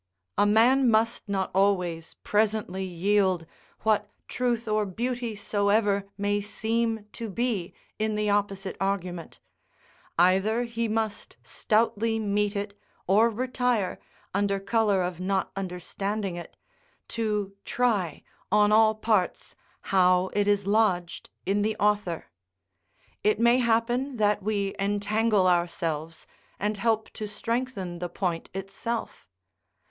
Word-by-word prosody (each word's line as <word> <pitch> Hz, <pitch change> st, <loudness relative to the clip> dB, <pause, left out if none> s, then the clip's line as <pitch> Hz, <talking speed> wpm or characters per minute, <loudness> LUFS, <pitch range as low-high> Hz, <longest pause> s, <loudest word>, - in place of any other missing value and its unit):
A 205 Hz, -, +3 dB
man 245 Hz, +5 st, +5 dB
must 225 Hz, 0 st, +1 dB
not 195 Hz, -2 st, -1 dB
always 180 Hz, -4 st, +1 dB
presently 210 Hz, -3 st, 0 dB
yield, 185 Hz, -1 st, +1 dB, 0.4 s
what 210 Hz, -1 st, +1 dB, 0.2 s
truth 240 Hz, -2 st, -1 dB
or 215 Hz, 0 st, +2 dB
beauty 235 Hz, +3 st, -3 dB
soever 200 Hz, -1 st, +1 dB
may 205 Hz, 0 st, 0 dB
seem 225 Hz, +1 st, -1 dB
to 230 Hz, -2 st, -6 dB
be 215 Hz, -4 st, -1 dB, 0.3 s
in 215 Hz, 0 st, 0 dB
the 210 Hz, 0 st, 0 dB
opposite 200 Hz, -2 st, 0 dB
argument; 185 Hz, -3 st, -3 dB, 0.8 s
either 190 Hz, +7 st, +3 dB
he 235 Hz, -1 st, -2 dB
must 220 Hz, -1 st, -3 dB
stoutly 225 Hz, 0 st, +1 dB
meet 205 Hz, -1 st, 0 dB
it, 200 Hz, 0 st, -3 dB, 0.3 s
or 215 Hz, +5 st, +4 dB
retire, 245 Hz, -3 st, -1 dB, 0.3 s
under 200 Hz, 0 st, +1 dB
colour 205 Hz, -2 st, +2 dB
of 180 Hz, -1 st, -4 dB
not 190 Hz, +1 st, -1 dB
understanding 195 Hz, +1 st, -3 dB
it, 175 Hz, -, -9 dB, 0.5 s
to 210 Hz, -3 st, -2 dB
try, 210 Hz, -11 st, 0 dB, 0.3 s
on 210 Hz, 0 st, +4 dB
all 220 Hz, 0 st, +5 dB
parts, 215 Hz, -4 st, 0 dB, 0.4 s
how 185 Hz, 0 st, +4 dB
it 205 Hz, 0 st, +1 dB
is 205 Hz, -1 st, +2 dB
lodged 200 Hz, -5 st, +1 dB, 0.2 s
in 200 Hz, +2 st, +1 dB
the 215 Hz, +1 st, 0 dB
author. 205 Hz, -5 st, 0 dB, 1.0 s
It 210 Hz, 0 st, +2 dB
may 235 Hz, +2 st, +5 dB
happen 240 Hz, +3 st, +1 dB
that 210 Hz, -1 st, +2 dB
we 200 Hz, -1 st, -1 dB
entangle 205 Hz, +1 st, +1 dB
ourselves, 165 Hz, -3 st, -1 dB, 0.3 s
and 210 Hz, +1 st, -1 dB
help 220 Hz, +1 st, 0 dB
to 215 Hz, -, -5 dB
strengthen 215 Hz, -4 st, -3 dB
the 175 Hz, 0 st, -3 dB
point 175 Hz, -3 st, -3 dB
itself. 195 Hz, +4 st, -5 dB
205 Hz, 120 wpm, -27 LUFS, 195-225 Hz, 1.0 s, man